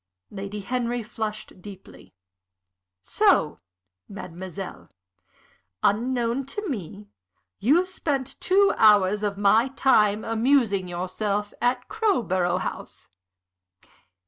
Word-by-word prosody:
Lady 200 +1 -6
Henry 240 +2 -2
flushed 215 -3 -6
deeply. 195 -1 -13 0.9
"So, - - +2 0.5
mademoiselle, 190 -1 -8 0.9
unknown 240 +4 0
to 415 +9 -5
me, 190 - -6 0.5
you 305 - +3
spent 290 -8 -3
two 395 +2 +4
hours 210 -2 +5
of 205 -2 -2
my 215 +4 +4
time 215 -6 +2
amusing 225 -4 +2
yourself 200 +4 -3
at 245 +1 0
Crowborough 190 - 0
House. - - -7
215 Hz, 90 wpm, -25 LUFS, 195-255 Hz, 0.9 s, hours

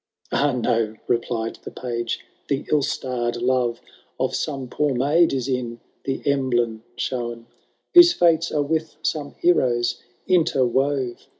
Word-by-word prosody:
"— - - -66
« - - -32
Ah, 145 0 +2
no 115 -3 0
I - - -25
" - - -36
replied 115 -1 -1
the - - -6
Page; 120 -2 -4
" - - -40
the 140 -1 -1
ill 150 - +4
starr'd 125 -3 -2
love 125 -1 +1 0.4
Of - - 0
some 135 -3 -3
poor 145 +2 0
maid 150 +7 +3
is 130 -2 -2
in 125 -3 -2 0.3
the 135 -1 -2
emblem 120 -5 +1
shown, 120 -2 -3 0.5
Whose 350 -1 +9
fates 170 - +3
are 150 -1 +1
with 160 +1 -2
some 155 -2 -2
heroes 125 -9 +2 0.3
interwove. 135 -6 +1
130 Hz, 160 wpm, -23 LUFS, 120-145 Hz, 0.5 s, Whose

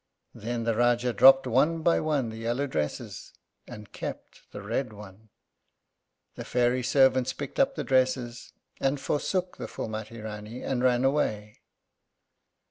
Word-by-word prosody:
Then 115 +2 -4
the 115 0 +1
Rájá 120 +1 +1
dropped 135 +5 +7
one 150 +7 +2
by 170 - +3
one 145 -6 0
the 110 - -8
yellow 120 +5 -1
dresses 75 - -4 0.3
and 105 0 -11
kept - - -8
the 105 - -8
red 115 +2 -2
one. 105 +1 -13 1.0
The - - -7
fairy 125 +1 +1
servants 130 0 +3
picked 140 -1 -7
up 275 0 +3
the - - -3
dresses, 130 -2 0 0.3
and 135 +1 0
forsook 180 +6 -2
the - - -6
Phúlmati 110 +1 -6
Rání 110 +2 -7
and 130 -2 -1
ran 125 -1 +3
away. 110 -7 -1
125 Hz, 140 wpm, -27 LUFS, 110-135 Hz, 1.0 s, dropped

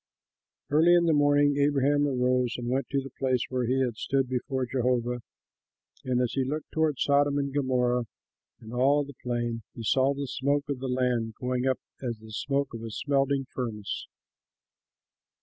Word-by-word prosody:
Early 165 +4 +6
in 170 -1 +4
the 165 - +3
morning 145 -1 +4
Abraham 145 0 +3
rose 125 -2 +1
and 120 -1 -5
went 135 +2 -1
to 140 - 0
the 135 - -9
place 130 -2 +1
where 125 -2 -1
he 130 +2 +2
had 120 -4 -1
stood 135 +1 0
before 130 +1 -2
Jehovah; 125 -1 0 0.8
and 125 -1 0
as 125 - 0
he 135 - +1
looked 150 +4 -4
toward 160 -3 +1
Sodom 140 +2 +3
and 140 -1 -1
Gomorrah 125 -3 +1 0.5
and 110 +1 -11
all 140 +4 +3
the 140 0 -10
plain, 120 -2 -2
he 115 - -6
saw 135 +4 +2
the 140 0 -3
smoke 140 +3 0
of 140 -3 -2
the 135 - -4
land 125 -3 0
going 125 0 -1
up 130 - +2 0.2
as 120 -3 -3
the 110 0 -13
smoke 135 +5 -1
of 115 - -6
a 115 - -5
smelting 140 +3 0
furnace. 110 -5 -4
130 Hz, 175 wpm, -28 LUFS, 125-140 Hz, 0.8 s, Early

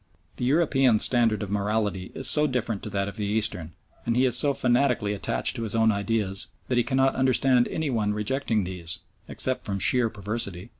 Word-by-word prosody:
The 125 - -3
European's 135 -5 +3
standard 115 -4 +1
of 100 - -7
morality 105 -2 -2
is 135 - +2
so 150 0 +5
different 120 -6 -3
to - - -7
that 100 0 -2
of 100 +1 -7
the 105 - -2
Eastern, 100 -6 -2 0.3
and 115 0 -1
he 130 - +3
is 125 -3 +2
so 140 +3 +3
fanatically 125 -5 +1
attached 100 - -1
to - - -4
his 115 -1 0
own 110 0 +3
ideas 100 -1 -1 0.2
that 125 -1 +1
he - - +2
cannot 135 +1 +1
understand 130 -1 +2
any 155 -3 -3
one 105 -4 0
rejecting 110 +1 -1
these, 90 0 -1 0.3
except 130 0 -1
from 100 -1 -3
sheer 120 +3 +3
perversity. 105 -2 -4
115 Hz, 195 wpm, -25 LUFS, 100-130 Hz, 0.3 s, so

